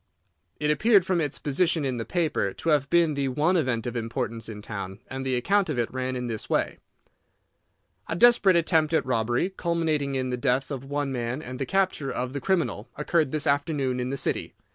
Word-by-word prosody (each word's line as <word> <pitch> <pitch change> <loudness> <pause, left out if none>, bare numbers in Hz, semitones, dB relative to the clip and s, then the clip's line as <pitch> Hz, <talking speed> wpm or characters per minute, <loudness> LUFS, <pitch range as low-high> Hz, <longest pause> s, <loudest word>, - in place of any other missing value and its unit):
It 150 0 +2
appeared 200 +3 +4
from 185 -3 +1
its 145 -3 -2
position 160 +1 +1
in 130 -2 -1
the 115 - -3
paper 155 - 0
to 165 - -3
have 145 -3 +2
been 170 -2 +3
the 140 -1 -1
one 150 +8 +1
event 130 -9 0
of 120 0 -4
importance 115 -1 -3
in 105 -1 -8
town, 95 -3 -6
and 130 0 -4
the 130 -1 0
account 195 +9 +2
of 150 - -2
it 120 0 -1
ran 130 0 -2
in 125 0 -3
this 115 -3 -4
way: - - 0 1.3
"A - - -2
desperate 210 -2 +6
attempt 160 -2 +2
at - - +1
robbery, 120 - 0
culminating 160 -6 -1
in 130 -1 -1
the 125 - -1
death 130 +2 0
of 135 -2 -4
one 145 0 -2
man 120 +1 -2
and 125 0 -7
the 135 - -2
capture 185 -7 0
of 125 +1 -3
the 140 - -4
criminal, 165 - -1
occurred 155 0 +1
this 150 +1 -2
afternoon 140 -3 0
in 125 0 -2
the 140 - -2
City. - - -2
140 Hz, 210 wpm, -26 LUFS, 125-165 Hz, 1.3 s, desperate